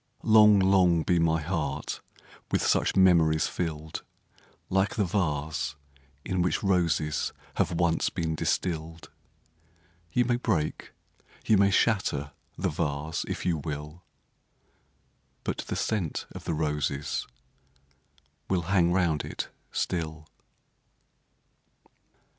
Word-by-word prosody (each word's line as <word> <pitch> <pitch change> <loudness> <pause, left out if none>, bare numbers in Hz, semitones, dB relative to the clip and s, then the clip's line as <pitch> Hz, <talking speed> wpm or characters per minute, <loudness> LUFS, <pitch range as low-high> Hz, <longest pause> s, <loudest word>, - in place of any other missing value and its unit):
Long, 105 -1 +7
long 95 -4 +4
be 85 +1 +2
my 80 -1 +2
heart 80 -1 -3 0.5
with - - +1
such - - +2
memories 85 -5 +5
fill'd! 80 -2 -4 0.7
Like 95 +1 +1
the 105 - +1
vase, 75 -6 -1 0.5
in 90 -1 0
which 90 +4 0
roses 85 -6 +1 0.3
have - - +1
once 85 -1 +1
been 80 -1 -2
distill'd 80 -1 -2 0.5
— 85 +1 -35
You 125 - +3
may 120 0 +1
break, 95 -11 -2 0.5
you 110 - +5
may 100 0 +5
shatter 95 -9 +1 0.3
the 95 +1 0
vase 75 0 -2
if - - -4
you 85 -3 +1
will, 75 +2 -6 1.4
But - - -3
the - - -4
scent 100 -8 -1
of - - -9
the 80 - -1
roses 75 -2 -1 1.2
will 95 -2 +2
hang 85 -3 +4
round 85 -4 +1
it - - -5 0.2
still. 80 -2 -3
85 Hz, 115 wpm, -28 LUFS, 80-95 Hz, 1.4 s, Long